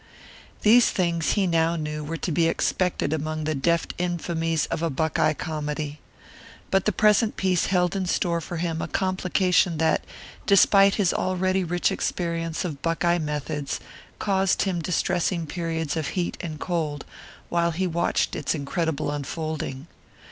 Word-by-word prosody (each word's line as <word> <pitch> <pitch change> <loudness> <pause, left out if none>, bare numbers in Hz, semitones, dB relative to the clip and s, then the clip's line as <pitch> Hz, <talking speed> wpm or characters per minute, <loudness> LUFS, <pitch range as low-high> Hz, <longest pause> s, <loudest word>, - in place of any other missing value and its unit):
These 235 +3 +6
things 170 -3 0
he 200 -2 +2
now 165 -1 +2
knew 150 -1 -4
were 165 +3 -4
to 170 - -3
be 165 +2 +3
expected 175 -2 0
among 155 0 -2
the 155 +1 0
deft 170 +4 0
infamies 165 -2 -1
of - - -1
a 165 - +1
Buckeye 155 +1 +1
comedy. 150 -2 -4 0.7
But 195 -1 +2
the 215 - +3
present 215 +2 +3
piece 185 -2 +1
held 180 -1 +1
in 190 -2 -1
store 170 -1 0
for 175 +2 -6
him 165 -1 -2
a - - -3
complication 185 -2 +1
that, 160 0 +2 0.4
despite 200 0 +6
his 195 -5 +2
already 185 +1 0
rich 175 +1 0
experience 165 -1 -2
of 150 -6 -5
Buckeye 170 +1 +1
methods, 150 -2 -3 0.4
caused 195 -2 +1
him 185 -4 -1
distressing 175 0 0
periods 165 -1 -3
of 160 -3 -2
heat 175 -1 -1
and 155 -3 -6
cold 155 -6 -2 0.4
while 170 0 +2
he 175 +3 -1
watched 170 -1 0
its 155 - -1
incredible 155 0 -2
unfolding. 145 -1 -4
170 Hz, 150 wpm, -25 LUFS, 155-180 Hz, 0.7 s, These